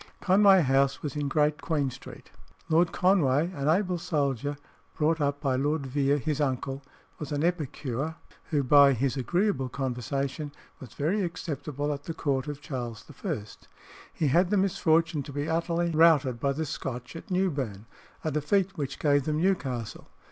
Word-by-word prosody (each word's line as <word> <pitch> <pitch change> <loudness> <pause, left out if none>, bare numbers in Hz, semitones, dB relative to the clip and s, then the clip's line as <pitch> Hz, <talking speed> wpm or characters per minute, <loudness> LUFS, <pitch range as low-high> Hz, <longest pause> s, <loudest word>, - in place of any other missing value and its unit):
Conway 190 -1 +5
House 135 0 +2
was 150 -2 -4
in 145 -1 -1
Great 150 +2 +1
Queen 145 -5 0
Street. 130 - -12 0.4
Lord 165 +1 +3
Conway, 170 -4 +2
an 140 -4 -3
able 180 +1 +1
soldier, 145 -5 -1 0.4
brought 160 +1 +1
up 145 0 0
by 135 -3 0
Lord 145 +2 0
Vere, 140 +2 +1
his 150 +1 -2
uncle, 135 0 -2 0.4
was 150 -2 -6
an 145 +1 -1
epicure, 155 -3 -2 0.3
who 145 -3 0
by 140 +1 +7
his 130 +2 0
agreeable 160 - 0
conversation 135 +3 -3 0.3
was 125 -5 -12
very 175 +9 0
acceptable 150 -4 -3
at 140 0 -8
the 165 - -5
court 135 -2 -1
of 145 -1 -6
Charles 120 -7 -6 0.2
I. 155 - -2 0.7
He 150 - 0
had 175 +6 +3
the 205 - +2
misfortune 165 -4 +2
to 140 - -8
be 145 +2 -3
utterly 170 +1 0
routed 155 -7 +4
by 140 +2 +1
the 160 +3 -2
Scotch 125 -2 -5
at 165 - -9
Newburn 140 - -1 0.4
a 155 - -1
defeat 185 +7 +1
which 135 -2 -3
gave 145 -2 +2
them 150 -1 0
Newcastle. 140 - -2
145 Hz, 160 wpm, -28 LUFS, 135-165 Hz, 0.7 s, by